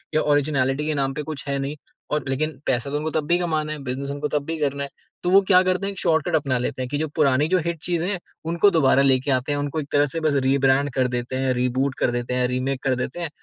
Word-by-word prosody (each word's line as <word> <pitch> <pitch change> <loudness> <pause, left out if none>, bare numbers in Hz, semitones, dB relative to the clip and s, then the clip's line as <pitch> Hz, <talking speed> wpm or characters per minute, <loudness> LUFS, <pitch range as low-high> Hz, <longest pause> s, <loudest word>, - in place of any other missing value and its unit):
या 155 - +4
ऑरिजिनैलिटी 145 -1 +1
के 155 - +1
नाम 135 0 -2
पे 150 - -4
कुछ 145 -1 -7
है 140 0 -1
नहीं। 140 +2 -3 0.4
और 150 - 0
लेकिन 155 +4 -2
पैसा 125 +2 0
तो 145 - 0
उनको 155 +1 -2
तब 155 -1 -1
भी 175 - +3
कमाना 155 -3 -1
है, 155 - -4
बिज़नेस 135 +2 -4
उनको 145 +1 -2
तब 145 -1 -1
भी 165 0 -3
करना 140 -1 -1
है। 140 - -5 0.3
तो 175 - +1
वो 195 +2 +7
क्या 185 -1 +5
करते 185 +1 0
हैं? 200 - -2
एक 195 - -8
शॉर्टकट 160 +1 +1
अपना 135 -4 +1
लेते 125 +1 -3
हैं 125 - -3
कि 145 - -1
जो 155 +1 -1
पुरानी 145 -1 +3
जो 185 +2 +2
हिट 170 0 -1
चीज़ें 175 0 0
हैं, 195 -3 -2 0.3
उनको 170 +5 +4
दोबारा 140 -5 +4
लेके 135 0 +2
आते 130 +3 0
हैं, 145 - 0
उनको 145 +2 -2
एक 140 - -5
तरह 145 0 +4
से 165 - -1
बस 155 -3 +1
रीब्रैंड 135 +1 +3
कर 130 0 +2
देते 125 +1 -3
हैं, 130 0 +1
रीबूट 130 +2 0
कर - - +2
देते 120 +1 -3
हैं, 125 0 +1
रीमेक 130 +1 -2
कर 130 -2 +2
देते 130 +6 -4
हैं। 170 -3 -3
145 Hz, 275 wpm, -23 LUFS, 130-155 Hz, 0.4 s, वो